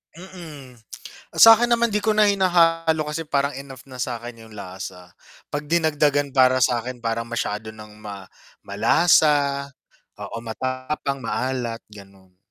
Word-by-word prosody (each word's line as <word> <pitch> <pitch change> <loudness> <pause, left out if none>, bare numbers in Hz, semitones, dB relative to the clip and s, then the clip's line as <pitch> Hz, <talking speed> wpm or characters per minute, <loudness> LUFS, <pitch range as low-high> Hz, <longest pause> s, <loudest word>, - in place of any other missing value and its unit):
Mm, 160 -9 -12 0.6
sa'kin 225 +1 +8
naman 235 -2 +2
'di 210 - +1
ko 215 0 0
na 215 - +5
hinahalo 165 -5 +2
kasi 150 +1 -5
parang 140 0 0
enough 135 -1 -10
na 130 -2 -10
sa'kin 120 -1 -5
yung 105 - -14
lasa, 90 -2 -9 0.4
'pag 145 0 -4
dinagdagan 145 -4 +1
para 130 -1 +4
sa'kin, 125 +1 -1
parang 115 0 -2
masyado 110 -2 -3
ng 110 -1 -11
ma 100 -2 -8 0.4
malasa 140 - +2 0.5
oo, 115 - -7
matapang, 130 +4 -4
maalat 120 -1 -3
ganon. 95 -2 -16
130 Hz, 130 wpm, -22 LUFS, 115-160 Hz, 0.6 s, sa'kin